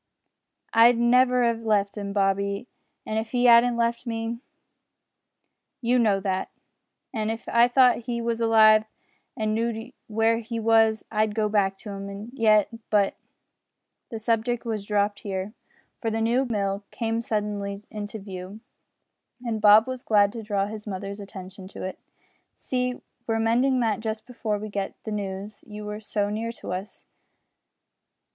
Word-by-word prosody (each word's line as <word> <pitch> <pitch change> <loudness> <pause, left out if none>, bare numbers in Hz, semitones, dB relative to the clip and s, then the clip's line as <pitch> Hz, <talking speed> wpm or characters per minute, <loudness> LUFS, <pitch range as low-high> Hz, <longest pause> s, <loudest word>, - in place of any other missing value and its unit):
"I'd 230 +1 +6
never 250 +1 +4
'ave 230 -1 +1
left 205 -3 +1
'im, 200 -1 -4
Bobby, 200 +1 0 0.4
if 220 +1 -2
he 245 0 +3
'adn't 235 0 +6
left 235 +1 0
me. 230 0 -3 1.4
You 245 0 +2
know 210 -4 +3
that. 190 -1 -2 0.6
An' 215 -2 -1
if 225 +1 -5
I 235 +1 +5
thought 245 -2 +4
he 235 -1 -1
was 235 0 -2
alive 220 -1 +6 0.5
and 215 -1 0
know'd 230 +2 -2 0.2
w'ere 225 +1 +2
he 230 0 -5
was, 225 -1 +3
I'd 215 -1 +1
go 215 -1 +1
back 195 -2 +1
to 210 - -7
'im 200 +3 -7
yet, 215 -5 +4 0.2
but 205 -2 +3 0.5
" - - -56
The 225 - -5
subject 230 +2 0
was 215 -3 -3
dropped 205 0 0
here, 195 -1 -4 0.5
for 225 - 0
the 225 0 -1
new 235 +4 +2
mill 200 -4 -1
came 225 -1 -2
suddenly 205 -2 -3
into 210 0 -5
view, 195 0 -8 0.9
and 225 -2 -2
Bob 210 +1 +7
was 255 -1 -5
glad 205 -3 +3
to 230 0 -6
draw 205 -2 0
his 215 +1 -8
mother's 200 +1 -5
attention 190 -1 -9
to 195 - -9
it. 185 - -5 0.6
"See, 250 -1 -2
we - - -17 0.3
were 225 -1 +1
mending 250 +3 +2
that 220 -3 +1
just 220 0 -4
before 225 -4 -3
we 215 +1 -6
got 200 -1 -3
the 220 - -5
news 200 0 -5
you 210 0 -8
were 210 0 -5
so 205 -1 -2
near 225 +2 -2
us. 185 +3 -6
220 Hz, 155 wpm, -25 LUFS, 205-230 Hz, 1.4 s, Bob